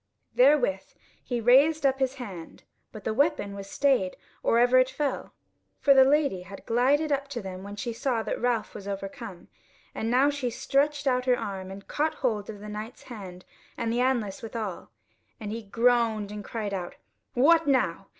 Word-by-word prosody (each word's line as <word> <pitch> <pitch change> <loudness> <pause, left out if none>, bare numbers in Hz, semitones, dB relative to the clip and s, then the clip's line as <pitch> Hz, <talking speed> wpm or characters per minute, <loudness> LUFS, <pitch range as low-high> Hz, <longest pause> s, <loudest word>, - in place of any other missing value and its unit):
Therewith 250 - +3 0.3
he 245 -2 -2
raised 280 +6 +4
up 270 0 +2
his 265 0 0
hand: 195 -11 -9 0.3
but 215 - -10
the 220 - -1
weapon 280 -6 +1
was 200 0 -8
stayed 255 -10 +1 0.2
or 230 - +2
ever 245 +2 +5
it 255 0 +3
fell, 275 +1 -3 0.4
for 280 - +5
the 265 -1 +8
Lady 275 -8 +2
had 195 +2 -11
glided 280 +6 +2
up 280 0 0
to 275 -4 -5
them 190 -3 -7
when 200 +1 -8
she 230 +3 -4
saw 230 -1 -1
that - - -3
Ralph 240 -2 0
was 200 -1 -9
overcome, 195 -1 -7 0.5
and 225 - -3
now 265 +4 +4
she 280 -4 -2
stretched 285 +4 0
out 250 -1 +1
her 250 -1 +3
arm 190 -1 -5
and 195 +1 -10
caught 310 +1 -1
hold 215 -6 -1
of 205 -2 -8
the 210 - -8
Knight's 215 +3 -7
hand 190 -7 -10 0.3
and 230 0 -1
the 240 - 0
anlace 240 -7 0
withal, 220 -5 -5 0.5
and 210 -2 -5
he 230 +1 -4
groaned 225 -1 +1
and 210 0 -6
cried 210 -1 -4
out: 180 -2 -4 0.4
"What 320 +5 +5
now! 195 -9 +1
235 Hz, 185 wpm, -27 LUFS, 200-270 Hz, 0.5 s, the